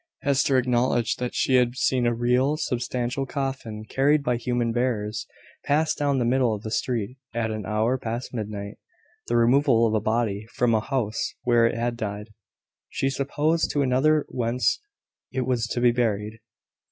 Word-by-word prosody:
Hester 140 Hz, 0 st, +2 dB
acknowledged 120 Hz, -2 st, +1 dB
that 125 Hz, -1 st, -3 dB
she 130 Hz, -, +3 dB
had 125 Hz, 0 st, +2 dB
seen 130 Hz, -2 st, +1 dB
a 120 Hz, -, +2 dB
real 125 Hz, +5 st, +2 dB
substantial 125 Hz, +1 st, -2 dB
coffin, 130 Hz, -6 st, -4 dB
carried 145 Hz, +4 st, +2 dB
by 125 Hz, -2 st, +1 dB
human 120 Hz, -1 st, -1 dB
bearers, 115 Hz, -3 st, -1 dB, 0.4 s
pass 155 Hz, +2 st, +2 dB
down 145 Hz, -2 st, 0 dB
the 125 Hz, -, +1 dB
middle 125 Hz, -2 st, +2 dB
of 105 Hz, -, -9 dB
the 110 Hz, -, -5 dB
street, 120 Hz, 0 st, -2 dB, 0.2 s
at 110 Hz, -1 st, -1 dB
an 110 Hz, -2 st, -5 dB
hour 110 Hz, +4 st, +1 dB
past 120 Hz, +1 st, -4 dB
midnight; 105 Hz, -3 st, -5 dB, 0.5 s
the 120 Hz, -, +1 dB
removal 120 Hz, 0 st, +4 dB
of 110 Hz, -, +1 dB
a 110 Hz, -, +3 dB
body 110 Hz, -1 st, -1 dB
from 120 Hz, -2 st, +2 dB
a 110 Hz, -, +4 dB
house 115 Hz, -4 st, -2 dB
where 120 Hz, -1 st, +4 dB
it -, -, -2 dB
had 120 Hz, 0 st, -2 dB
died, 105 Hz, -1 st, -5 dB, 0.6 s
she 135 Hz, -, -1 dB
supposed, 150 Hz, +4 st, 0 dB
to 145 Hz, -, +1 dB
another 140 Hz, +4 st, +3 dB
whence 125 Hz, 0 st, 0 dB, 0.5 s
it 130 Hz, -, -1 dB
was 120 Hz, -2 st, 0 dB
to 120 Hz, -, -2 dB
be 120 Hz, 0 st, +5 dB
buried. 110 Hz, -2 st, -1 dB
120 Hz, 170 wpm, -25 LUFS, 115-130 Hz, 0.6 s, be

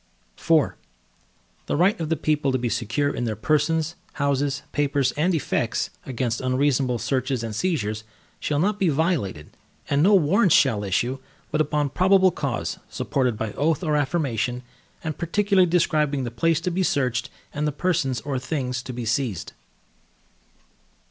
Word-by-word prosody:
IV 160 Hz, -3 st, +2 dB, 1.0 s
The -, -, 0 dB
right 185 Hz, +5 st, +3 dB
of 160 Hz, -2 st, -3 dB
the 165 Hz, -, +2 dB
people 150 Hz, -2 st, 0 dB
to 130 Hz, -, +1 dB
be 120 Hz, -1 st, -1 dB
secure 135 Hz, +7 st, 0 dB
in 120 Hz, -, -2 dB
their 110 Hz, -2 st, -2 dB
persons, 155 Hz, -, +1 dB, 0.2 s
houses, 140 Hz, -1 st, 0 dB
papers, 140 Hz, -2 st, +1 dB
and 170 Hz, +4 st, +1 dB
effects, 155 Hz, -, -1 dB, 0.2 s
against 120 Hz, -2 st, -2 dB
unreasonable 130 Hz, -1 st, +1 dB
searches 130 Hz, +1 st, -1 dB
and 110 Hz, -2 st, -4 dB
seizures, 110 Hz, -, -1 dB, 0.4 s
shall 145 Hz, -, -1 dB
not 200 Hz, +6 st, +1 dB
be 190 Hz, -, +3 dB
violated, 140 Hz, -, -1 dB, 0.4 s
and 140 Hz, 0 st, +3 dB
no 200 Hz, +5 st, +6 dB
Warrants 185 Hz, +2 st, +4 dB
shall 110 Hz, -7 st, +3 dB
issue, 120 Hz, +7 st, 0 dB, 0.3 s
but 155 Hz, -, +2 dB
upon 150 Hz, -1 st, 0 dB
probable 190 Hz, +2 st, +4 dB
cause, -, -, -3 dB
supported 125 Hz, -5 st, -1 dB
by 110 Hz, -1 st, -3 dB
oath 155 Hz, -, 0 dB
or 155 Hz, -3 st, +1 dB
affirmation, 130 Hz, -5 st, -1 dB, 0.4 s
and 155 Hz, -2 st, -4 dB
particularly 190 Hz, +1 st, +2 dB
describing 150 Hz, -5 st, +1 dB
the 120 Hz, -, -4 dB
place 165 Hz, +5 st, +1 dB
to 180 Hz, -, -1 dB
be 185 Hz, +2 st, 0 dB
searched, 130 Hz, -8 st, 0 dB, 0.2 s
and 150 Hz, +1 st, -1 dB
the -, -, 0 dB
persons 145 Hz, -5 st, 0 dB
or 140 Hz, -3 st, -2 dB
things 125 Hz, -2 st, -3 dB
to 130 Hz, -, -7 dB
be 120 Hz, -1 st, -5 dB
seized. 115 Hz, -, -2 dB
145 Hz, 155 wpm, -24 LUFS, 125-160 Hz, 1.0 s, no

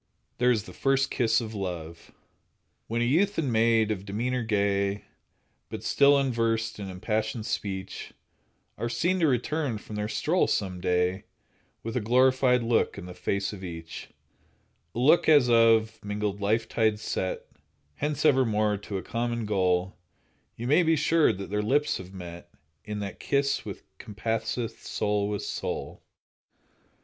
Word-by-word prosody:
There 125 Hz, 0 st, +4 dB
is 110 Hz, -5 st, +2 dB
the -, -, -11 dB
first 135 Hz, 0 st, +1 dB
kiss 115 Hz, -1 st, +2 dB
of 110 Hz, -1 st, -6 dB
love: 85 Hz, -5 st, -6 dB, 0.8 s
When 115 Hz, +1 st, 0 dB
a -, -, +1 dB
youth 190 Hz, +11 st, +2 dB
and 140 Hz, -7 st, 0 dB
maid 110 Hz, -1 st, +3 dB
of 95 Hz, -3 st, -3 dB
demeanor 120 Hz, +6 st, -2 dB
gay, 100 Hz, -2 st, 0 dB, 0.7 s
But -, -, -6 dB
still 140 Hz, 0 st, +5 dB
unversed 115 Hz, -4 st, 0 dB
in 100 Hz, -2 st, -5 dB
impassioned 110 Hz, +4 st, -2 dB
speech, 95 Hz, -3 st, -4 dB, 0.7 s
Are 120 Hz, -, -1 dB
seen 180 Hz, +9 st, 0 dB
to 165 Hz, -, +3 dB
return 135 Hz, 0 st, 0 dB
from 105 Hz, 0 st, -8 dB
their 105 Hz, 0 st, -2 dB
stroll 165 Hz, +10 st, +1 dB
some 95 Hz, -3 st, -1 dB
day 90 Hz, +1 st, 0 dB, 0.6 s
With 115 Hz, +1 st, -5 dB
a -, -, +2 dB
glorified 125 Hz, +2 st, +3 dB
look 115 Hz, -3 st, +1 dB
in 100 Hz, -, -7 dB
the 90 Hz, -, -8 dB
face 100 Hz, +3 st, -2 dB
of 95 Hz, -2 st, -9 dB
each— 85 Hz, -2 st, -8 dB, 0.9 s
A -, -, -5 dB
look 145 Hz, +8 st, +4 dB
as 145 Hz, -6 st, +6 dB
of 115 Hz, -1 st, +4 dB
mingled 105 Hz, -1 st, -3 dB
life 110 Hz, +3 st, +1 dB
tides 110 Hz, -2 st, +1 dB
set 95 Hz, -3 st, -3 dB, 0.5 s
Hence 150 Hz, +1 st, -2 dB
evermore 110 Hz, -7 st, +3 dB
to 100 Hz, 0 st, -5 dB
a 95 Hz, -, -5 dB
common 120 Hz, +2 st, -2 dB
goal— 95 Hz, -2 st, +1 dB, 0.6 s
You 120 Hz, -, -6 dB
may 150 Hz, +8 st, +4 dB
be 165 Hz, -1 st, +3 dB
sure 160 Hz, +1 st, +3 dB
that 100 Hz, +1 st, -7 dB
their 105 Hz, 0 st, 0 dB
lips 145 Hz, +8 st, +1 dB
have 95 Hz, 0 st, -10 dB
met 85 Hz, -2 st, -9 dB, 0.3 s
In 105 Hz, -1 st, -5 dB
that 100 Hz, -1 st, -6 dB
kiss 140 Hz, 0 st, 0 dB
which -, -, -7 dB, 0.2 s
compasseth 110 Hz, +2 st, -3 dB
soul 105 Hz, -1 st, -1 dB
with 105 Hz, -1 st, -3 dB
soul. -, -, -4 dB
110 Hz, 155 wpm, -27 LUFS, 100-125 Hz, 0.9 s, as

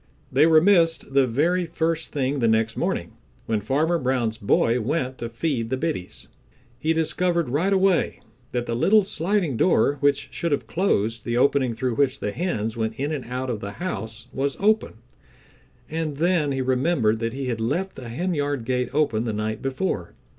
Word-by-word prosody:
They 145 Hz, +5 st, +5 dB
were 160 Hz, -1 st, +6 dB
missed 165 Hz, -6 st, +3 dB
the 135 Hz, -1 st, +4 dB
very 170 Hz, +9 st, +1 dB
first 165 Hz, 0 st, -1 dB
thing 140 Hz, -1 st, -1 dB
the 115 Hz, -, +2 dB
next 110 Hz, 0 st, +2 dB
morning -, -, -2 dB, 0.3 s
when 110 Hz, -2 st, -1 dB
Farmer 155 Hz, -, +1 dB
Brown's 125 Hz, -4 st, 0 dB
boy 115 Hz, +4 st, +2 dB
went 130 Hz, +1 st, -2 dB
to 115 Hz, -, -4 dB
feed 120 Hz, -1 st, -2 dB
the 130 Hz, -, -1 dB
biddies. 130 Hz, -, -4 dB, 0.5 s
He 155 Hz, +4 st, 0 dB
discovered 170 Hz, -1 st, +1 dB
right 160 Hz, +10 st, +1 dB
away 190 Hz, -2 st, +2 dB, 0.3 s
that 120 Hz, -1 st, -2 dB
the 115 Hz, -, -3 dB
little 205 Hz, -, +4 dB
sliding 175 Hz, -, 0 dB
door 145 Hz, -3 st, +3 dB
which 140 Hz, 0 st, +1 dB
should 170 Hz, -, -2 dB
have 145 Hz, -, -1 dB
closed 115 Hz, -, 0 dB
the 120 Hz, 0 st, -1 dB
opening 130 Hz, -2 st, +2 dB
through 125 Hz, -1 st, -2 dB
which 135 Hz, -2 st, +1 dB
the 105 Hz, -, -2 dB
hens 110 Hz, -, -2 dB
went 110 Hz, 0 st, -3 dB
in 145 Hz, +3 st, -1 dB
and 145 Hz, -4 st, -4 dB
out 125 Hz, +1 st, -3 dB
of 110 Hz, -, -3 dB
the 100 Hz, 0 st, -6 dB
house 110 Hz, -11 st, -5 dB
was 140 Hz, +1 st, -1 dB
open, 215 Hz, +2 st, +2 dB, 0.9 s
and 155 Hz, -2 st, -3 dB
then 165 Hz, -3 st, +2 dB
he 135 Hz, -1 st, -1 dB
remembered 130 Hz, -4 st, +1 dB
that 115 Hz, 0 st, -2 dB
he 135 Hz, 0 st, -4 dB
had 115 Hz, -2 st, -2 dB
left 185 Hz, +12 st, -1 dB
the 125 Hz, -3 st, -9 dB
henyard 145 Hz, -3 st, -2 dB
gate 125 Hz, 0 st, 0 dB
open 130 Hz, -7 st, +1 dB
the 110 Hz, -, -2 dB
night 110 Hz, +1 st, -3 dB
before. 135 Hz, -, -3 dB
135 Hz, 180 wpm, -24 LUFS, 115-165 Hz, 0.9 s, were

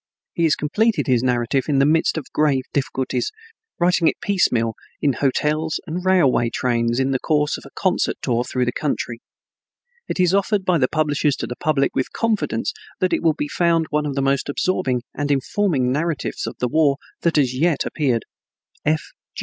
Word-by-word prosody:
He 170 Hz, -, +1 dB
has 155 Hz, -, +3 dB
completed 215 Hz, +10 st, +1 dB
his 125 Hz, -4 st, +2 dB
narrative 125 Hz, +1 st, 0 dB
in 145 Hz, -3 st, +1 dB
the 135 Hz, -, +4 dB
midst 160 Hz, +2 st, +2 dB
of 155 Hz, -, -4 dB
grave 145 Hz, -4 st, +2 dB
difficulties, 135 Hz, -, -1 dB, 0.5 s
writing 175 Hz, -1 st, +3 dB
it -, -, +1 dB
piecemeal 120 Hz, -, +1 dB, 0.3 s
in 140 Hz, -2 st, +2 dB
hotels 150 Hz, +4 st, 0 dB
and 175 Hz, +2 st, -4 dB
railway 165 Hz, -11 st, +3 dB
trains 120 Hz, 0 st, 0 dB
in 135 Hz, 0 st, +1 dB
the 130 Hz, -, 0 dB
course 150 Hz, 0 st, +1 dB
of -, -, -10 dB
a -, -, -16 dB
concert -, -, +1 dB
tour 120 Hz, 0 st, 0 dB
through 125 Hz, 0 st, -1 dB
the 125 Hz, -, 0 dB
country. 120 Hz, -4 st, -3 dB, 0.9 s
It -, -, -4 dB
is 180 Hz, 0 st, +3 dB
offered 200 Hz, 0 st, +1 dB
by 180 Hz, -2 st, +3 dB
the 130 Hz, -, +3 dB
publishers 150 Hz, -1 st, +1 dB
to -, -, -4 dB
the 125 Hz, -, -6 dB
public 145 Hz, -1 st, +1 dB
with 130 Hz, -, -1 dB
confidence 225 Hz, -3 st, -1 dB, 0.3 s
that 185 Hz, -, +1 dB
it -, -, +1 dB
will 160 Hz, -2 st, +2 dB
be 150 Hz, -, -2 dB
found 165 Hz, 0 st, +2 dB
one 150 Hz, 0 st, 0 dB
of 140 Hz, -, -3 dB
the 135 Hz, -, 0 dB
most 140 Hz, +1 st, 0 dB
absorbing 140 Hz, -6 st, 0 dB
and 145 Hz, +1 st, -3 dB
informing 140 Hz, -1 st, +1 dB
narratives 155 Hz, +2 st, -2 dB
of -, -, -5 dB
the 125 Hz, -, 0 dB
war 145 Hz, +1 st, +2 dB, 0.2 s
that 170 Hz, -, +1 dB
has 135 Hz, -4 st, +3 dB
yet 160 Hz, +2 st, +1 dB
appeared. 130 Hz, -7 st, 0 dB
145 Hz, 185 wpm, -21 LUFS, 130-165 Hz, 0.9 s, the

